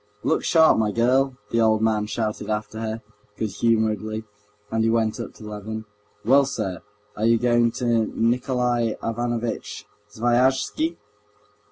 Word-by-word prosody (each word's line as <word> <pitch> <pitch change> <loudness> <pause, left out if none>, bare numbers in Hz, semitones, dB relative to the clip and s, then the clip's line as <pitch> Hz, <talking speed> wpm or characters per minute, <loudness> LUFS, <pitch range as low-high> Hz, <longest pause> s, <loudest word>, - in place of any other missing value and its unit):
"Look - - +1
sharp, 160 -7 +5
my 105 -1 +1
girl!" 130 +3 +2
the 115 - +2
old 110 -1 +4
man 105 -1 +1
shouted 110 -2 -3
after 110 +1 -3
her, 110 0 -4 0.3
good 110 -2 -2
humoredly, 110 -1 0 0.5
and 110 0 +1
he 115 - +2
went 115 -1 +1
up - - -6
to - - -13
Levin. 105 +1 -6 0.4
"Well, 135 +4 +5
sir, 105 -10 -4 0.3
are 110 - -1
you 115 0 +5
going 120 0 +3
to 115 -3 +1
Nikolay 120 -1 0
Ivanovitch 120 0 -3 0.2
Sviazhsky? 130 +8 +1
115 Hz, 140 wpm, -23 LUFS, 110-120 Hz, 0.5 s, sharp